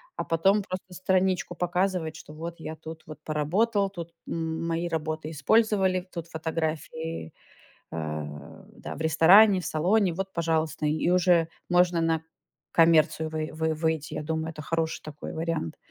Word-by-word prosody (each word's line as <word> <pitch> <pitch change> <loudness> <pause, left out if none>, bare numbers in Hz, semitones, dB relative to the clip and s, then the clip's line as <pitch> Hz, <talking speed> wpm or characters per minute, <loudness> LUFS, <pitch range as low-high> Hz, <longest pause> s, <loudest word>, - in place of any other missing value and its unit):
а - - -2
потом 195 +5 +3
просто 185 -1 -7
страничку 185 -1 +1
показывать, 180 -2 0
что 150 - -11
вот 165 +2 -7
я 160 0 -6
тут 160 0 -9
вот 155 -1 -9
поработал, 195 +7 +1
тут 170 -3 -8 0.2
м 165 0 -3
мои 165 +1 -1
работы 155 -1 -3
использовали, 190 +2 +2
тут 170 -1 -5
фотографии. 160 - -4 0.6
Э, 80 -1 -3 0.5
да - - -7
в 160 - -8
ресторане, 185 +6 +7
в - - -8
салоне, 185 +3 +2
вот, 195 +2 -4
пожалуйста, 160 -2 0
и 155 +3 +1
уже 175 -2 +4 0.2
можно 175 -1 +3
на 165 -1 +1 0.5
коммерцию 160 -1 +4
вый 155 0 -3
вы 160 0 -1
выйти, 160 -1 -1
я - - -3
думаю, 160 +1 -2
это 155 -1 -8
хороший 165 +1 -2
такой 150 -1 -7
вариант. 165 - -2
165 Hz, 150 wpm, -27 LUFS, 155-180 Hz, 0.6 s, ресторане